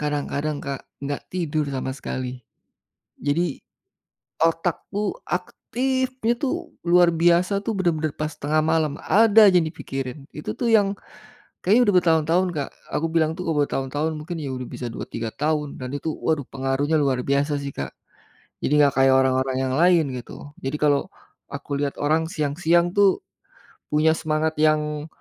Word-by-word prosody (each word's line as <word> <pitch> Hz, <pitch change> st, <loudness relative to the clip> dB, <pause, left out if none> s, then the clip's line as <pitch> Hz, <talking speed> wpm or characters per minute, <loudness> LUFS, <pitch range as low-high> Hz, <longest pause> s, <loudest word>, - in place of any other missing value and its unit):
kadang-kadang, 150 Hz, 0 st, -2 dB
Kak, 140 Hz, -2 st, -4 dB, 0.2 s
gak 145 Hz, 0 st, -3 dB
tidur 155 Hz, -5 st, -2 dB
sama 130 Hz, -1 st, -3 dB
sekali. 130 Hz, -2 st, -5 dB, 0.8 s
Jadi 145 Hz, +2 st, 0 dB, 0.9 s
otakku 175 Hz, -, 0 dB
aktifnya 260 Hz, -1 st, -1 dB
tuh 275 Hz, -, -2 dB, 0.2 s
luar 175 Hz, 0 st, +6 dB
biasa 175 Hz, +4 st, +3 dB
tuh 220 Hz, +2 st, -3 dB
benar-benar 160 Hz, -5 st, 0 dB
pas 155 Hz, 0 st, -2 dB
tengah 150 Hz, +1 st, 0 dB
malam, 160 Hz, -2 st, +1 dB
ada 220 Hz, +1 st, +6 dB
aja 180 Hz, -, +5 dB
yang 160 Hz, -, -1 dB
dipikirin, 135 Hz, -2 st, -6 dB
itu 150 Hz, -8 st, -5 dB
tuh 235 Hz, -, 0 dB
yang 205 Hz, -2 st, +4 dB, 0.7 s
kayaknya 215 Hz, +7 st, +5 dB
udah 205 Hz, -, +4 dB
bertahun-tahun, 165 Hz, +1 st, +2 dB
Kak, 145 Hz, -4 st, -3 dB, 0.2 s
aku 165 Hz, -, 0 dB
bilang 160 Hz, -1 st, +1 dB
tuh 180 Hz, +1 st, -6 dB
kalau 160 Hz, -2 st, +1 dB
bertahun-tahun 145 Hz, +4 st, -2 dB
mungkin 160 Hz, +3 st, -6 dB
ya 135 Hz, -2 st, -4 dB
udah 125 Hz, -1 st, -5 dB
bisa 125 Hz, -, -6 dB
2, -, -, -6 dB
3 115 Hz, -1 st, -4 dB
tahun 150 Hz, -1 st, -2 dB
dan 125 Hz, -, -5 dB
itu 160 Hz, +2 st, -3 dB
waduh 155 Hz, -2 st, -1 dB
pengaruhnya 135 Hz, +3 st, 0 dB
luar 130 Hz, -3 st, +1 dB
biasa 140 Hz, +1 st, +1 dB
sih, 140 Hz, -1 st, -5 dB
Kak. 70 Hz, -, -6 dB, 0.7 s
Jadi -, -, 0 dB
gak 140 Hz, -2 st, +4 dB
kayak 135 Hz, 0 st, +5 dB
orang-orang 130 Hz, 0 st, +1 dB
yang 130 Hz, -1 st, -1 dB
lain, 170 Hz, 0 st, +5 dB
gitu. 145 Hz, +4 st, -10 dB
Jadi 135 Hz, +3 st, -1 dB
kalau 145 Hz, -2 st, +2 dB, 0.4 s
aku 140 Hz, -, -4 dB
lihat 140 Hz, 0 st, -2 dB
orang 155 Hz, +3 st, +2 dB
siang-siang 170 Hz, +4 st, +1 dB
tuh 200 Hz, -2 st, +4 dB, 0.7 s
punya 155 Hz, +1 st, +3 dB
semangat 155 Hz, 0 st, -1 dB
yang 150 Hz, -1 st, +1 dB
155 Hz, 155 wpm, -23 LUFS, 140-170 Hz, 0.9 s, luar